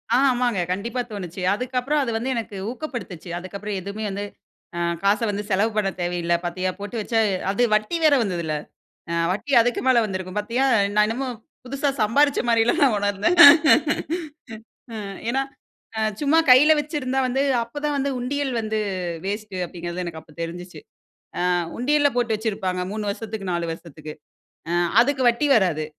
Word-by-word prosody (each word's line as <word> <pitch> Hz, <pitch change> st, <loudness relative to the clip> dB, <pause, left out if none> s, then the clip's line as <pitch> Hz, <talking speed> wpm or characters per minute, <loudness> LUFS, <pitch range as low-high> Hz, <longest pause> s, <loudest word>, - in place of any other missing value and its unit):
ஆ, -, -, +5 dB
ஆமாங்க. 245 Hz, -5 st, 0 dB
கண்டிப்பா 230 Hz, +7 st, -2 dB
தோணுச்சு. 185 Hz, -3 st, -6 dB
அதுக்கப்புறம், 255 Hz, +6 st, -1 dB
அது 240 Hz, -, -2 dB
வந்து 240 Hz, +4 st, -3 dB
எனக்கு 220 Hz, -3 st, -5 dB
ஊக்கப்படுத்துச்சு. 245 Hz, -, -7 dB
அதுக்கப்புறம் 200 Hz, +3 st, -6 dB
எதுவுமே 200 Hz, +3 st, -5 dB
வந்து 200 Hz, +1 st, -4 dB, 0.5 s
அ -, -, -2 dB, 0.2 s
காச 200 Hz, +1 st, +2 dB
வந்து 205 Hz, 0 st, -3 dB
செலவு 205 Hz, +3 st, +2 dB
பண்ணத் 200 Hz, -3 st, -1 dB
தேவையில்ல. 175 Hz, -1 st, -1 dB
பார்த்தியா 185 Hz, +2 st, -2 dB
போட்டு 205 Hz, +4 st, -7 dB
வச்சா 225 Hz, +2 st, 0 dB, 0.3 s
அது 205 Hz, +5 st, +1 dB
வட்டி 215 Hz, +10 st, +1 dB
வேற 300 Hz, -2 st, +6 dB
வந்ததுல்ல. 170 Hz, -7 st, -2 dB, 0.6 s
அ -, -, -1 dB, 0.2 s
வட்டி 210 Hz, +10 st, -3 dB
அதுக்கு 245 Hz, +1 st, +1 dB
மேல 255 Hz, -2 st, +5 dB
வந்திருக்கும். 185 Hz, -2 st, -5 dB
பார்த்தியா, 235 Hz, +5 st, 0 dB, 0.3 s
நான் 210 Hz, 0 st, +4 dB
என்னமோ 255 Hz, +4 st, -3 dB, 0.4 s
புதுசா 275 Hz, +3 st, -2 dB
சம்பாரிச்ச 280 Hz, +7 st, +3 dB
மாரிலா 230 Hz, 0 st, +3 dB
நான் 265 Hz, -6 st, +4 dB
உணர்ந்தேன். 205 Hz, -, 0 dB, 1.6 s
ம். 200 Hz, -2 st, -6 dB
ஏனா 265 Hz, +3 st, +1 dB, 0.8 s
சும்மா 295 Hz, +2 st, +3 dB
கையில 280 Hz, +5 st, +8 dB
வச்சிருந்தா 290 Hz, -3 st, -3 dB
வந்து 255 Hz, +2 st, -1 dB, 0.2 s
அப்ப 235 Hz, +5 st, -7 dB
தான் 295 Hz, -1 st, 0 dB
வந்து 280 Hz, 0 st, 0 dB
உண்டியல் 270 Hz, +2 st, -2 dB
வந்து 220 Hz, 0 st, -2 dB, 0.5 s
வேஸ்ட் 205 Hz, +1 st, -4 dB
அப்படிங்கிறது 175 Hz, 0 st, -6 dB
எனக்கு 165 Hz, -2 st, -6 dB
அப்ப 160 Hz, -1 st, -20 dB
தெரிஞ்சுச்சு. 175 Hz, +2 st, -7 dB, 0.6 s
ஆ -, -, +1 dB, 0.4 s
உண்டியல்ல 290 Hz, +3 st, +2 dB
போட்டு 240 Hz, -2 st, +1 dB
வச்சிருப்பாங்க 195 Hz, -4 st, -2 dB
3 210 Hz, -1 st, -3 dB
வருஷத்திக்கு 205 Hz, -2 st, -5 dB
4 170 Hz, -1 st, -2 dB
வருஷத்திக்கு. 155 Hz, -2 st, -10 dB, 0.6 s
அ -, -, -1 dB, 0.3 s
அதுக்கு 265 Hz, +1 st, +1 dB
வட்டி 240 Hz, +5 st, 0 dB
வராது. 175 Hz, -8 st, +1 dB
215 Hz, 150 wpm, -23 LUFS, 185-255 Hz, 1.6 s, கையில